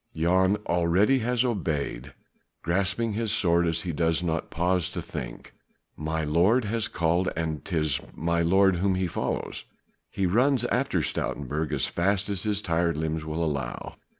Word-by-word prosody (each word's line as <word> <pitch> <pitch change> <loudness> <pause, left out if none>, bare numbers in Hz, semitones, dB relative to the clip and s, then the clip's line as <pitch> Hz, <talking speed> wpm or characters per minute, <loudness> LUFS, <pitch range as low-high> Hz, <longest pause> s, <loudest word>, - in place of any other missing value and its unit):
Jan 95 +4 +3
already 90 +9 +3
has 125 +1 +1
obeyed, 75 - -2 0.5
grasping 100 +6 0
his 110 0 -1
sword 85 -5 +2
he 85 +2 -1
does 80 +1 +1
not 80 -2 -2
pause 90 0 0
to - - -5
think. - - -7 0.4
My 80 +1 -2
lord 90 +11 +3
has 110 +1 -1
called 85 +1 +1
and 80 -2 -3
'tis 80 -6 0 0.2
my 85 +1 0
lord 95 +2 +4
whom 95 +1 +1
he 95 0 0
follows. 85 - -3 0.5
He 95 - -1
runs 125 +7 +3
after - - +1
Stoutenburg 75 +2 -2
as 75 - +1
fast 100 +3 0
as 95 -2 -2
his 105 0 -1
tired 85 -2 +1
limbs 80 0 -2
will 80 +1 -1
allow. 70 -5 -4
85 Hz, 150 wpm, -27 LUFS, 80-100 Hz, 0.5 s, lord